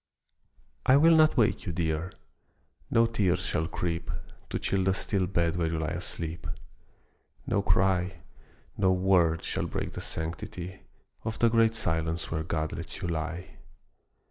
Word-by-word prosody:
I 130 - +6
WILL 165 +3 +6
not 155 -2 +5
wake 110 -3 +2
you, - - 0
dear; 85 +1 -1 0.8
no 115 0 +4
tears 95 -6 +1
shall 80 - 0
creep 85 -1 -3 0.4
To - - -1
chill 95 -1 0
the 95 0 +3
still 95 -2 0
bed 85 -2 +1
where 85 -2 +1
you 80 0 -1
lie 80 -1 -2
asleep; 85 0 -3 1.0
No - - +1
cry, 90 -1 +2 0.6
no 95 -2 +3
word, 90 -3 +3
shall - - -1
break - - -4
the - - -5
sanctity 85 +3 -5 0.4
Of 110 -1 -3
the 115 - +4
great 115 0 +4
silence 80 -5 -1
where 80 -1 -1
God 80 -1 -2
lets 85 +3 -6
you 90 - -1
lie. 85 +2 -3
90 Hz, 150 wpm, -29 LUFS, 80-100 Hz, 1.0 s, I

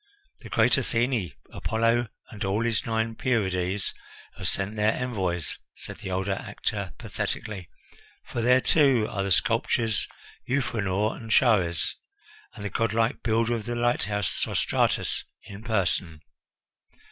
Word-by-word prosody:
"The - - -11
great - - +4
Athene, 115 - 0 0.2
Apollo, 115 +1 +1 0.2
and 105 - -5
all 100 +3 +1
his 115 +1 0
nine 110 0 0
Pierides, 95 -5 0 0.4
have - - -2
sent 100 +2 0
their 105 +1 +3
envoys," 95 - -2 0.2
said - - -9
the - - -6
older 95 +1 0
actor - - -3
pathetically, 95 -5 -4 0.6
"for 120 - -3
there, 125 +2 +5
too, 135 -9 +4
are 100 - -3
the 100 0 -2
sculptors 110 +4 +2 0.4
Euphranor 110 -6 0
and 115 - -9
Chares, 100 -7 +3 0.6
and 105 - -7
the 100 - -3
godlike 115 +2 +1
builder 115 +1 +1
of 110 -3 -3
the 120 +1 -2
lighthouse, 110 -4 +1
Sostratus - - +1 0.2
in 100 0 -10
person." 95 -7 0
110 Hz, 130 wpm, -27 LUFS, 95-115 Hz, 0.6 s, there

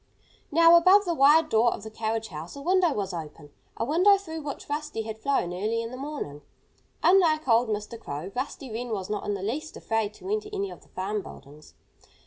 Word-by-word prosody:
Now, 335 +2 +7
above 375 +4 +6
the 345 - 0
wide 305 +2 +5
door 230 +2 +4
of - - -12
the 220 - -8
carriage 220 0 -3
house 160 - -8
a 280 - -8
window 365 0 +3
was 200 -7 -3
open 150 -3 -8 0.3
a 230 - -1
window 365 +9 +5
through 320 -5 -7
which 285 -2 -7
Rusty 290 -6 -3
had 220 0 -7
flown 270 -10 0
early 220 +5 -1
in 230 - -6
the - - -6
morning. 265 - -6 0.6
Unlike 325 -5 +4
old 230 0 +4
Mr. 210 +2 -4
Crow, 155 0 -6
Rusty 260 0 -4
Wren 240 +3 -4
was 205 -2 -4
not 210 - -3
in 205 - -1
the 190 - -6
least 295 +10 -4
afraid 220 -2 -2
to - - -11
enter 425 0 -2
any 400 -1 -3
of - - -11
the - - -23
farm 200 +3 -3
buildings. 150 -3 -14
230 Hz, 210 wpm, -27 LUFS, 210-315 Hz, 0.6 s, Now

